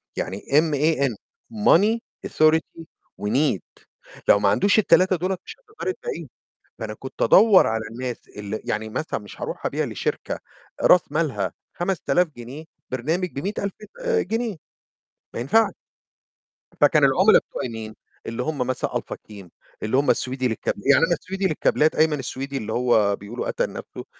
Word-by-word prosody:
يعني 95 +2 -3
M-A-N 150 -4 +2 0.4
Money 210 +1 +4 0.3
Authority 160 +1 +2 0.4
وNEED 110 - -1 0.4
لو 100 - +6
ما 100 - +3
عندوش 200 - +3
ال3 185 -1 +4
دول 185 +3 -2
مش - - -9
هتقدري 430 -5 -5
تبيعي 475 +3 -6
لُه، - - -12 0.5
فأنا - - -5
كنت - - -7
أدوّر 215 -4 +7
على 110 0 -1
الناس 125 +1 -6
اللي 105 +1 -5
يعني 110 +1 -2
مثلًا 115 +1 -3
مش 105 - -13
هاروح - - -4
أبيع - - -1
لشركة - - -3 0.4
راس 175 -5 +5
مالها 135 - -1 0.2
5.000 180 -1 +1
جنيه 125 +6 -9 0.3
برنامج 160 +8 -1
ب100.000 200 +6 -3 0.3
آآ، 475 -2 +2
جنيه 225 -3 -2 0.8
ما - - -4
ينفعش. 210 - +3 1.1
فكان - - +5
العملا - - +6
بتوعي 125 - -6
مين؟ 110 -1 -7 0.3
اللي 115 +2 -3
هُم 155 +2 -3
مثلًا 130 0 -1
Alpha - - -3
CLEAN 100 -4 -13 0.4
اللي 110 +5 +1
هُم 145 - +2
السويدي 130 0 +1
للكاب 110 - -2
يعني 135 +8 +4
أنا 170 - +1
السويدي 195 +2 -4
للكابلات، 155 -1 +2
أيمن 155 -2 +3
السويدي 135 +2 -4
اللي 110 -2 -4
هو 110 -5 +3
بيقولوا 105 +5 -6
قَتَل - - -1
نَفْسُه، - - -8
140 Hz, 150 wpm, -23 LUFS, 115-180 Hz, 1.1 s, أدوّر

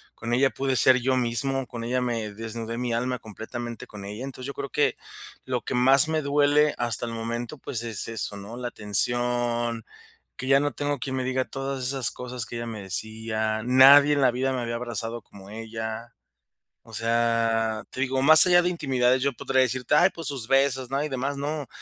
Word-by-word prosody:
con 115 +1 -4
ella 135 +2 +4
pude 135 -1 -2
ser 130 0 +6
yo 130 +1 +1
mismo, 130 +2 0
con 115 0 -7
ella 125 +2 0
me 115 -4 -2
desnudé 115 +1 -5
mi 125 -1 -2
alma 125 +2 -1
completamente 120 +3 -7
con 105 -2 -10
ella, 105 +5 -6
entonces, 130 -1 -7
yo 140 - -5
creo 140 -1 -6
que, 145 -1 +1 0.5
lo 125 -2 -2
que - - -5
más 135 +4 +6
me 155 -1 0
duele 145 +1 +3
hasta 120 -1 -1
el 115 - -5
momento, 115 +4 -4
pues, 120 -3 -4
es 115 -3 -4
eso, 110 -2 -4
¿no?, 105 +4 -9
la 125 0 -4
atención, 120 +2 -1 0.5
que 130 - -6
ya 135 +1 +5
no 145 -1 -1
tengo 145 +2 -2
quien 130 +1 -4
me 130 - -2
diga 130 0 0
todas 135 0 -5
esas 130 -1 0
cosas 125 -1 -6
que 120 - -7
ella 115 - -4
me 110 -3 -6
decía, 110 +2 -3
nadie 140 +3 +7
en 145 - 0
la 130 -2 +5
vida 130 +2 -1
me 130 - -2
había 115 -1 -3
abrazado 115 -1 -4
como 100 0 -15
ella, 110 +1 -6 0.7
o - - -16
sea, 115 -1 +1
te 130 - -5
digo, 130 0 0
más 155 +3 +8
allá 175 -1 +5
de 175 - 0
intimidades, 130 -6 +1
yo 140 -1 +1
podría 130 +2 +1
decirte, 130 +1 -1
"Ay, - - +6
pues 165 -2 -6
sus 135 -6 -4
besos", 135 -1 +2
¿no?, 140 +2 0
y 150 - -3
demás, 135 +2 -3
no, 145 0 -3
125 Hz, 205 wpm, -25 LUFS, 115-135 Hz, 0.7 s, más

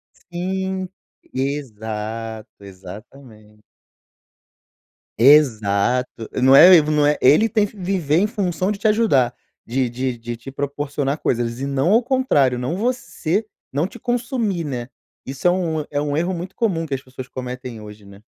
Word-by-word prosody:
Sim! 190 +1 -4 0.4
Exato, 110 -4 -4 0.2
exatamente. 105 +3 -13 1.6
Exato! 120 -3 +3
Não 130 +1 +7
é 160 - +10
el 160 - +6
v 150 - -2
não 150 -1 +3
é, 150 0 +3
ele 155 - +5
tem 215 -2 +2
que 205 - -16
viver 180 -6 0
em 200 - +3
função 195 -3 -1
de 200 - -7
te 220 - +2
ajudar, 210 - +3 0.3
de 130 +1 -1
de 125 +1 -3
de 120 0 -6
te 120 +4 -10
proporcionar 140 +1 -3
coisas 120 -1 -1
e 135 - -2
não 140 +6 +1
ao 230 +3 +5
contrário, 230 - +2
não 125 +8 -2
você 225 -4 -2 0.3
não 145 +6 0
te 235 - -12
consumir, 240 -7 -1
né? 125 -5 -4 0.4
Isso 135 +5 -5
é - - +7
um 165 -4 -1
é 145 - -2
um 145 -1 -2
erro 175 +4 0
muito 180 +3 -7
comum 185 -8 0
que 145 -4 -3
as 135 - -5
pessoas 130 -1 -10
cometem 125 -2 -7
hoje, 105 0 -12
né? 100 +2 -16
140 Hz, 160 wpm, -21 LUFS, 120-185 Hz, 1.6 s, é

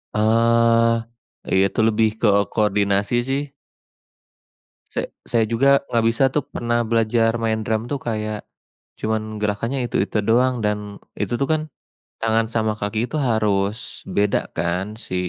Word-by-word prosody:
Eee, 115 +1 +4 0.6
ya 95 - +5
itu - - -6
lebih 110 0 +3
keo 100 -3 +3
koordinasi 100 0 +1
sih. 140 +1 -2 1.4
Sa - - -1 0.2
saya 115 -1 +2
juga 140 +4 +4
enggak 115 -1 +2
bisa 115 +3 +1
tuh 145 -2 -1
pernah 120 0 -1
belajar 115 0 +2
main 110 -1 +1
drum 110 +3 -2
tuh 140 - -1
kayak 110 -3 -4 0.5
cuman 110 0 -2
gerakannya 105 +6 -1
itu-itu 115 - 0
doang 125 +1 +2
dan 105 -1 -3 0.2
itu - - -2
tuh 140 - +3
kan, 155 - +2 0.6
tangan 115 0 +2
sama 110 -1 0
kaki 110 +3 -1
itu - - -12
harus 105 +1 -1
beda 105 +1 +1 0.2
kan 90 +2 -1
si 95 - -7
110 Hz, 135 wpm, -21 LUFS, 105-115 Hz, 1.4 s, ya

